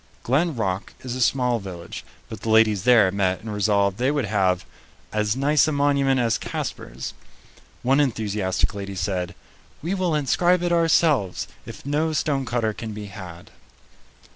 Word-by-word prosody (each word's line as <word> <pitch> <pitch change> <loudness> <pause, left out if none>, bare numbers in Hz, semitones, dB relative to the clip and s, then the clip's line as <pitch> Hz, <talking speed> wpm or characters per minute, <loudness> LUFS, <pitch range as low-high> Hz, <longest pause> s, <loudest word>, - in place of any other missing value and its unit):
Glen 155 +5 +1
Rock 95 -4 -2
is 125 -1 -5
a 130 - -3
small 125 -1 +2
village, 90 -4 -8 0.2
but - - -8
the 115 - -3
ladies 110 -3 +4
there 115 -7 +6
met 95 -2 0
and 110 -1 -6
resolved 100 -1 +2
they 130 +2 +2
would 145 -4 0
have 95 -3 +1 0.5
"as 105 +1 +1
nice 145 +3 +3
a - - +1
monument 140 -2 +2
as 115 -2 +1
Casper's." - - -5 0.7
One 135 +3 +3
enthusiastic 105 -8 0
lady 100 -1 -6
said, 90 -2 -2 0.5
"We 175 +4 -1
will 185 -4 0
inscribe 175 +5 +2
it 175 - 0
ourselves, 160 - +2 0.2
if - - -10
no 155 +3 0
stonecutter 125 -7 0
can 110 0 -6
be 105 0 -6
had." 90 -3 -10
115 Hz, 155 wpm, -23 LUFS, 100-140 Hz, 0.7 s, there